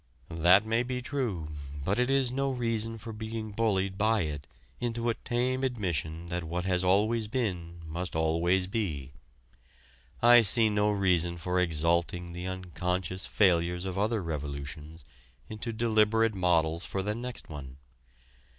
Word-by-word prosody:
That 90 +6 +5
may 115 +1 +1
be 125 0 -3
true, 125 - -3 0.4
but 100 +5 +1
it 125 +1 +2
is 135 -2 +2
no 135 +1 0
reason 115 -3 -1
for 115 0 -8
being 110 0 -5
bullied 100 -3 0
by 110 0 +3
it 75 -2 -5 0.3
into 120 0 -1
a - - +2
tame 125 +3 -1
admission 85 - -2
that 85 0 -3
what 85 +2 -3
has 90 -1 +1
always 105 +4 +2
been 90 -8 -3
must 85 +3 -5
always 85 +4 +2
be. 85 - -3 1.1
I 120 0 +8
see 110 +1 +4
no 105 0 +2
reason 90 -4 +2
for 90 +2 -1
exalting 85 +1 0
the 90 +1 -5
unconscious 90 0 -3
failures 90 -2 +2
of 95 0 -3
other 105 0 0
revolutions 75 0 -5 0.5
into 110 +2 -4
deliberate 110 0 +2
models 85 -3 +1
for 95 - -3
the 105 +2 -1
next 120 +2 -6
one. 70 -4 -9
95 Hz, 145 wpm, -29 LUFS, 85-115 Hz, 1.1 s, I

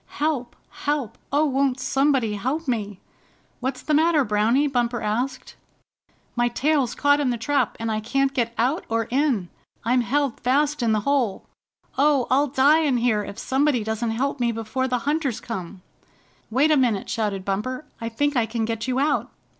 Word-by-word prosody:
"Help! 290 -5 -1 0.3
Help! 280 -7 0 0.2
Oh, 290 +2 +3
won't 270 -2 +1
somebody 270 -4 +1
help 265 +10 -2
me?" 210 -6 -2 0.6
"What's 260 +2 -3
the 305 - -1
matter, 315 -1 +4
Browny?" 220 +6 +2
Bumper 245 -4 0
asked. 245 +5 -2 0.8
"My 240 0 +2
tail's 275 +1 +1
caught 285 0 +3
in 280 -3 +1
the 240 - -1
trap, 280 +5 0
and 225 0 -2
I 215 - 0
can't 275 +5 0
get 235 -3 0
out 260 +9 +1
or 230 0 +1
in. 255 - +1 0.4
I'm 250 +2 +3
held 270 +1 0
fast 285 +3 +1
in 230 -2 +2
the 215 -1 +1
hole. 255 -5 0 0.5
Oh, 280 -3 +4
I'll 280 +3 +4
die 290 +3 +4
here 235 -3 +1
if 200 0 -8
somebody 265 -3 +1
doesn't 220 +2 -2
help 265 +5 -1
me 240 -1 +1
before 225 +4 -2
the 250 -1 0
Hunters 290 -5 0
come." 185 -4 -7 0.7
"Wait 275 +7 +3
a 305 - +5
minute!" 235 -7 +1
shouted 205 -4 -2
Bumper. 250 +9 -2 0.2
"I 230 - -2
think 290 +5 0
I 235 -3 +2
can 225 0 -2
get 225 +1 -3
you 255 0 0
out." 290 +1 +1
250 Hz, 175 wpm, -23 LUFS, 225-285 Hz, 0.8 s, a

